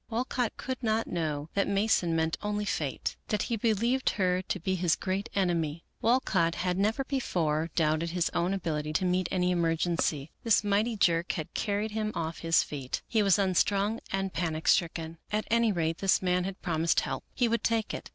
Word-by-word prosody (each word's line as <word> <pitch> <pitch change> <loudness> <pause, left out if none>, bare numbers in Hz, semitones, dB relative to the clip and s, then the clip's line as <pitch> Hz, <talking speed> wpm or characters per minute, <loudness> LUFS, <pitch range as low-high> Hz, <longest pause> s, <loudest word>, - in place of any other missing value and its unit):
Walcott 240 0 -1
could 260 -1 -4
not 220 -1 +1
know 155 -3 -3
that 200 - +1
Mason 200 -4 +2
meant 160 0 +1
only 210 0 -2
Fate, 150 -8 -2
that 210 -1 0
he 235 - -1
be 225 +1 +1
lieved 240 +5 +1
her 185 -2 +1
to - - -3
be 185 +3 -1
his 175 -2 +2
great 190 +1 -3
enemy. 170 -4 0 0.2
Walcott 195 -8 +2
had 180 0 -1
never 220 +7 +1
before 165 - -1
doubted 160 +1 +1
his 175 0 0
own 175 +2 0
ability 155 -5 -2
to 185 - +1
meet 180 0 +1
any 180 -1 +1
emergency. 165 -3 0
This 225 -3 +4
mighty 210 +3 +1
jerk 170 -2 +2
had 155 -3 -5
carried 210 +1 -1
him 215 0 -2
off 160 0 -3
his 165 0 +3
feet. 135 -3 -5
He 220 - +2
was 200 -2 +4
unstrung 200 +3 +1
and 195 -1 -1
panic 160 -2 -2
stricken. 165 -2 +1
At 210 0 0
any 230 -1 +4
rate 165 -3 -1
this 195 -1 +3
man 180 -1 +1
had 195 0 -6
promised 165 -1 +2
help. - - -4
He 245 - +2
would 230 0 0
take 225 -1 0
it. - - -6
185 Hz, 190 wpm, -29 LUFS, 165-210 Hz, 0.2 s, This